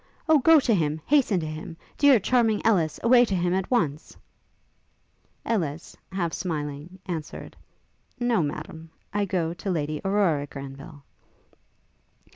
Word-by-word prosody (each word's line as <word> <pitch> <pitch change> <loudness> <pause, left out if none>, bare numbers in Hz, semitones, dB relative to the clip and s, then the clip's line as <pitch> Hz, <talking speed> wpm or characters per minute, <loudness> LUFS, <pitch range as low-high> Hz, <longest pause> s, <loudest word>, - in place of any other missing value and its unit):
O 315 -2 +5
go 320 +4 +6
to 250 -4 +1
him! 155 -5 0
hasten 265 -10 +3
to - - -4
him! 155 +1 -7 0.2
dear, 280 -5 +5
charming 225 0 +2
Ellis, 170 -9 +2
away 245 +1 +6
to 205 -5 -1
him 175 0 0
at 190 0 -1
once! 155 - -1 0.6
' - - -42
Ellis, 165 -8 -2 0.2
half 175 -3 -2
smiling, 150 0 -5
answered, 160 -4 -6 0.6
'No, 240 -5 +2
Madam; 160 +2 -6 0.2
I 205 0 +1
go 170 -4 -1
to 185 +3 -6
Lady 155 -3 -2
Aurora 190 -8 +1
Granville.' 140 +2 -10
175 Hz, 135 wpm, -25 LUFS, 155-220 Hz, 0.6 s, go